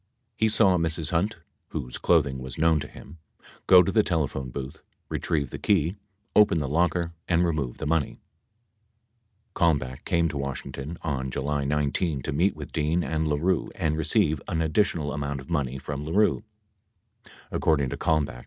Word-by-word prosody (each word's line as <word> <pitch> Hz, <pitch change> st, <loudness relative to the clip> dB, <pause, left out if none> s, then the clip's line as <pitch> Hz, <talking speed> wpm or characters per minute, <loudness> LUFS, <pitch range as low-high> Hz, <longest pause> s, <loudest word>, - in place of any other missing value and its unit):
He 110 Hz, -, +2 dB
saw 100 Hz, -4 st, +4 dB
Mrs. 80 Hz, -1 st, -1 dB
Hunt 85 Hz, +6 st, 0 dB, 0.3 s
(whose 60 Hz, 0 st, -5 dB
clothing 70 Hz, -6 st, +2 dB
was 65 Hz, 0 st, -7 dB
known 80 Hz, 0 st, +3 dB
to 75 Hz, -, -5 dB
him) 80 Hz, +3 st, -13 dB, 0.5 s
go 90 Hz, -1 st, +8 dB
to 95 Hz, -, -1 dB
the 110 Hz, -, +4 dB
telephone 75 Hz, -8 st, -1 dB
booth, 65 Hz, +1 st, -7 dB, 0.3 s
retrieve 70 Hz, -6 st, -1 dB
the -, -, -6 dB
key, 90 Hz, -2 st, +2 dB, 0.4 s
open 105 Hz, -5 st, +6 dB
the' 75 Hz, -, -2 dB
locker 85 Hz, +2 st, +1 dB
and 90 Hz, 0 st, +3 dB
remove 75 Hz, -7 st, -2 dB
the -, -, -5 dB
money. 75 Hz, -2 st, 0 dB, 1.4 s
81 85 Hz, -3 st, +4 dB
Kalmbach 65 Hz, -1 st, -8 dB
came 85 Hz, -1 st, +2 dB
to 75 Hz, -, -4 dB
Washington 70 Hz, +3 st, -5 dB
on 65 Hz, -4 st, -2 dB
July 70 Hz, +2 st, -2 dB
19 75 Hz, 0 st, 0 dB
to -, -, -3 dB
meet 85 Hz, +6 st, +2 dB
with 75 Hz, -1 st, -8 dB
Dean 80 Hz, +2 st, 0 dB
and 80 Hz, -1 st, -1 dB
LaRue 80 Hz, +4 st, +1 dB
and 80 Hz, -2 st, 0 dB
receive 80 Hz, -1 st, +1 dB
an 80 Hz, -, -1 dB
additional 80 Hz, -2 st, +1 dB
amount 70 Hz, -1 st, -3 dB
of 70 Hz, +6 st, -11 dB
money 70 Hz, -5 st, -1 dB
from 70 Hz, +1 st, -5 dB
LaRue. 100 Hz, +8 st, +2 dB
75 Hz, 155 wpm, -26 LUFS, 70-85 Hz, 1.4 s, go